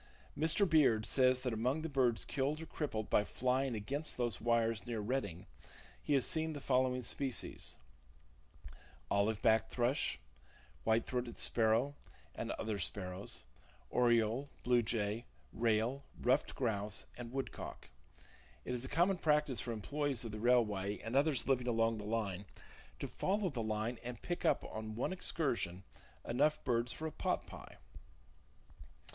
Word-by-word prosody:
Mr. 160 +7 +4
Beard 135 -10 +4
says 130 -1 +3
that 125 -2 -1
among 125 +8 0
the - - -1
birds 130 -6 +2
killed 140 +2 -1
or 160 - -6
crippled 125 -10 -3
by 105 - +3
flying 130 +2 0
against 140 +9 -3
those 120 -2 -1
wires 115 -2 +1
near 115 -2 -2
Redding 105 -6 -2 0.6
he 145 - +1
has 135 - +4
seen 160 0 +1
the 145 - -5
following 130 -2 +1
species: 135 -1 -2 1.4
olive 105 +1 +2
backed 110 -2 +4
thrush, 125 +3 0 0.7
white 110 +1 +3
throated 125 -2 -3
sparrow 115 +5 +2 0.4
and - - -4
other 110 -2 -3
sparrows, 90 - -4 0.5
oriole, 120 +2 +3
blue 125 -1 +4
jay, 110 0 -1 0.3
rail, 115 +4 +1 0.2
ruffed 130 +4 +2
grouse, 105 -5 0
and 120 -1 -7
woodcock. 135 - -5 0.7
It - - -2
is 125 0 -2
a - - -3
common 175 +4 +2
practice 150 -4 +2
for 120 - -4
employees 130 +4 -1
of 115 - -4
the 105 - -5
railway, 105 -4 +2
and 115 +3 -5
others 140 0 +3
living 125 -2 +2
along 115 -1 +2
the 105 - -6
line, 105 -3 -2 0.5
to - - -4
follow 195 -1 0
the 125 -4 -3
line 110 +2 -2
and 120 0 -6
pick 175 -1 -4
up - - +3
on 110 0 -6
one 125 +10 -1
excursion 120 - -1 0.4
enough 145 +6 +2
birds 120 -1 +1
for 160 - -4
a 160 - -2
pot - - -1
pie. - - -11
120 Hz, 150 wpm, -36 LUFS, 110-135 Hz, 1.4 s, Mr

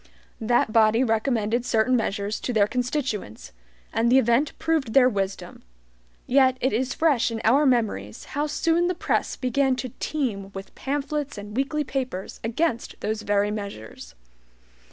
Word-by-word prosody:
That 225 -1 +1
body 225 +2 +4
recommended 225 0 0
certain 245 +1 +2
measures 210 -2 -1
to 250 - -3
their 210 -3 +4
constituents, 250 - -3 0.4
and 235 +1 +2
the 260 - +6
event 250 +3 +2
proved 310 -8 0
their 260 -2 +6
wisdom; 195 -4 -3 0.6
yet 260 -1 +4
it 260 -1 0
is 255 +4 -1
fresh 295 -8 +2
in 225 -1 -4
our 275 +6 +4
memories 215 - -1
how 290 +2 0
soon 330 +3 +1
the 360 - -1
press - - -1
began 265 +1 +1
to 255 -1 -5
teem 215 -10 -2
with 195 0 -8
pamphlets 285 -1 -3
and 205 +1 -8
weekly 275 +3 0
papers 255 -9 -4
against 235 +1 -1
those 215 0 -2
very 205 0 +1
measures. 200 - -7
240 Hz, 150 wpm, -24 LUFS, 215-270 Hz, 0.6 s, the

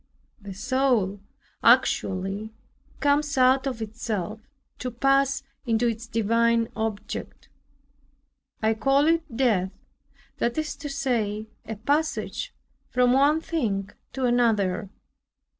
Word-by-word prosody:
The 195 -2 -8
soul 240 -5 +1 0.4
actually 195 +3 +2 0.5
comes 290 0 +2
out 260 +1 +4
of 240 -4 -3
itself 215 -2 -4 0.4
to 250 - -3
pass 275 +3 +2 0.2
into 230 -1 +1
its 230 -1 -2
divine 230 +1 +2
object. 220 -2 -5 1.1
I 220 0 +4
call 270 +6 +3
it 325 -6 +1
death, 215 -8 +2 0.7
that 240 +3 -1
is 310 -1 -2
to 290 0 -6
say, 220 -6 -1 0.2
a 220 - -4
passage 305 - -1 0.4
from 250 0 +3
one 290 +4 +4
thing 210 -13 -2 0.2
to 265 -1 -1
another. 220 -6 +2
235 Hz, 110 wpm, -25 LUFS, 215-275 Hz, 1.1 s, out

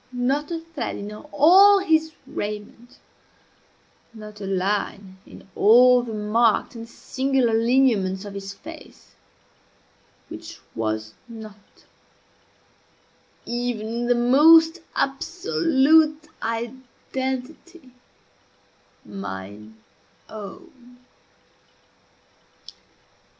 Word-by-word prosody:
Not 270 +4 -1
a 335 -1 -3
thread 330 -3 -6
in 205 +1 -7
all 355 - +5
his 320 -4 +1
raiment 210 +3 -7 1.2
not 210 -1 -11
a 195 - -5
line 195 0 -3
in - - -14
all 245 +3 +6
the 240 -2 -7
marked 215 +1 +1
and 230 -1 -10
singular 265 -2 -1
lineaments 225 -5 +1
of 200 - -8
his 195 0 -7
face 195 - -13 1.1
which - - -10
was 110 -1 -3
not, 215 -3 -13 1.6
even 240 -2 -3
in 235 +1 -3
the 245 - +3
most 320 +7 +5 0.2
absolute 310 -1 +1 0.2
identity, 260 +5 -6 1.1
mine 105 - -9 0.5
own! 250 - -12
240 Hz, 80 wpm, -23 LUFS, 210-290 Hz, 1.6 s, all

